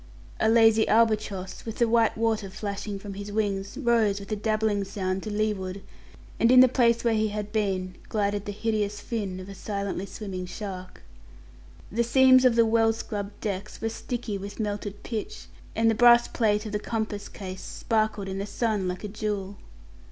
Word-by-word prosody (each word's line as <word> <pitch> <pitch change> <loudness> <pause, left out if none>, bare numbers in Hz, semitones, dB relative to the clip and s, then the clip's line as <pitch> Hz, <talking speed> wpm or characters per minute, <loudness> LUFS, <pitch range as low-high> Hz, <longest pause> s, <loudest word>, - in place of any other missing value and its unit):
A 220 - +3
lazy 225 -1 +5
albatross, 215 -4 +1
with 225 -1 -6
the 235 - +3
white 225 -1 +3
water 220 -3 0
flashing 205 0 -5
from 200 0 -8
his 200 +1 -7
wings, 200 -2 -2
rose 230 -6 +2
with 200 +1 -10
a - - +1
dabbling 215 -1 0
sound 190 -1 -3
to 215 - -5
leeward, 200 -3 -2 0.6
and 230 - +4
in 255 - +8
the 255 - +9
place 235 -2 +2
where 235 -1 +2
he 215 0 +2
had 210 0 -4
been 190 -4 -1
glided 205 -1 -1
the 205 - -3
hideous 210 -1 -1
fin 205 -4 -4
of 185 - -8
a 200 - -8
silently 200 -1 -4
swimming 185 -3 -6
shark. 185 - -7 0.9
The 235 +3 +1
seams 260 +2 +6
of 245 -2 +5
the 230 -1 +5
well 225 0 +3
scrubbed 205 -2 -6
deck 200 0 -3
were 225 - -1
sticky 225 -3 -4
with 200 +2 -8
melted 205 -1 -4
pitch, 225 -3 -5 0.3
and 225 +1 +2
the 225 - +5
brass 240 +1 +6
plate 210 -2 +1
of 215 - -5
the 210 - -1
compass 215 -2 -3
case 190 -1 -7
sparkled 215 -3 -1
in 190 0 -4
the 200 - -3
sun 210 -2 -1
like 180 +2 -4
a - - -3
jewel. 205 -1 -4
210 Hz, 185 wpm, -26 LUFS, 200-225 Hz, 0.9 s, the